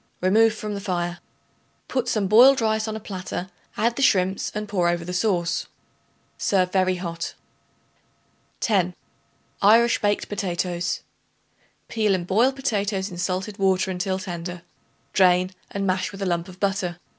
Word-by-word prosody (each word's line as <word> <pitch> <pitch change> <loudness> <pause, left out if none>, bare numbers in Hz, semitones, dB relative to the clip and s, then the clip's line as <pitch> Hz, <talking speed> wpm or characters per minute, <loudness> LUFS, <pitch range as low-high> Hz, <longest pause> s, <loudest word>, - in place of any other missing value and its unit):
Remove 220 +5 +4
from 215 -1 -5
the 200 - -4
fire. 175 -3 -2 0.7
Put 255 -2 -1
some 215 -4 +1
boiled 245 +7 +7
rice 220 -1 0
on 220 - -3
a - - -4
platter; 185 -2 -6 0.3
add 235 +1 +1
the - - -1
shrimps 190 -6 +2
and 210 0 -3
pour 180 -4 +1
over 170 -1 -1
the 180 - -5
sauce. 180 -3 0 0.7
Serve 185 -2 +1
very 185 -1 +2
hot. 170 -2 -5 1.3
10. 185 -5 +1 0.7
Irish 230 +4 +5
Baked 205 -1 0
Potatoes. 175 -3 -2 0.9
Peel 215 -3 +1
and 175 -2 -3
boil 225 +8 +3
potatoes 205 -7 -2
in 175 - -8
salted 185 +3 -2
water 190 -1 +2
until 185 +1 -1
tender; 175 -1 -6 0.5
drain 185 -1 +4 0.2
and 200 0 -3
mash 185 -1 0
with 195 -1 -6
a - - -1
lump 170 -2 -1
of 185 0 -13
butter. 195 -3 -1
190 Hz, 150 wpm, -24 LUFS, 180-210 Hz, 1.3 s, boiled